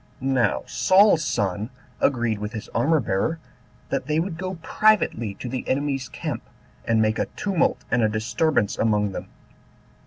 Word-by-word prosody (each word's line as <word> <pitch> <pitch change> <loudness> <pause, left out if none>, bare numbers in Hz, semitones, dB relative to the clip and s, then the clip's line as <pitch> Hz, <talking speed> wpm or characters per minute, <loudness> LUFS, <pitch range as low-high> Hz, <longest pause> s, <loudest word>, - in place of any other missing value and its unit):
Now 130 -5 +1
Saul's 190 -3 +4
son 105 - -1 0.3
agreed 120 -5 +1
with 105 +1 -5
his 110 - -6
armor 155 +7 +2
bearer, 110 +8 -1 0.5
that - - -2
they 155 +1 +1
would 170 0 -2
go 185 +3 -4
privately 155 - +2
to 125 - -7
the 130 +1 -3
enemy's 135 -1 -1
camp, - - -4 0.4
and 115 -1 +2
make 110 +1 0
a - - 0
tumult 190 -5 0
and 125 - +3
a 110 - +3
disturbance 115 +2 0
among 105 -2 +2
them. - - -6
125 Hz, 155 wpm, -24 LUFS, 110-160 Hz, 0.5 s, Saul's